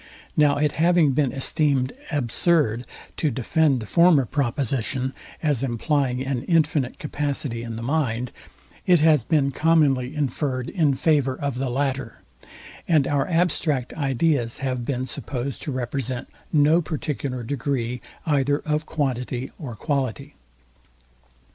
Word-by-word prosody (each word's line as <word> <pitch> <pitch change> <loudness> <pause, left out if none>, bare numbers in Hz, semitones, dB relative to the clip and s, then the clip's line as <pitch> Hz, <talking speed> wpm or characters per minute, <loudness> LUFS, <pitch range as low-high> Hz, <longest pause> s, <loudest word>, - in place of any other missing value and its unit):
Now 145 -2 +4
it 150 0 +2
having 170 -2 +3
been 135 -1 +1
esteemed 135 -1 0 0.2
absurd 135 -2 +1 0.3
to 155 - +1
defend 140 +2 +1
the - - -6
former 170 - +5
proposition, 130 0 -1 0.3
as 145 -6 +1
implying 130 +1 0
an 135 -3 -1
infinite 155 -6 +1
capacity 145 -5 -3
in 115 -1 -5
the 115 - -6
mind, 125 -4 -1 0.6
it 175 -4 +5
has 155 -5 +5
been 140 -1 +2
commonly 145 -4 +2
inferred 135 -2 -1
in 155 -7 +2
favour 140 -3 +2
of 140 0 -2
the 135 -1 -1
latter: 135 -2 -2 0.7
and 155 -5 +4
our 145 -1 +1
abstract 165 -6 0
ideas 135 -3 0
have 130 -3 -2
been 130 -1 -2
supposed 130 +1 -5
to 145 - -3
represent 130 0 -3 0.2
no 155 +3 +4
particular 140 -5 -3
degree 125 -1 -2 0.2
either 145 -2 +2
of 155 +1 -2
quantity 130 -3 -2
or 130 -8 -6
quality. 140 +1 -2
140 Hz, 130 wpm, -24 LUFS, 125-150 Hz, 0.7 s, former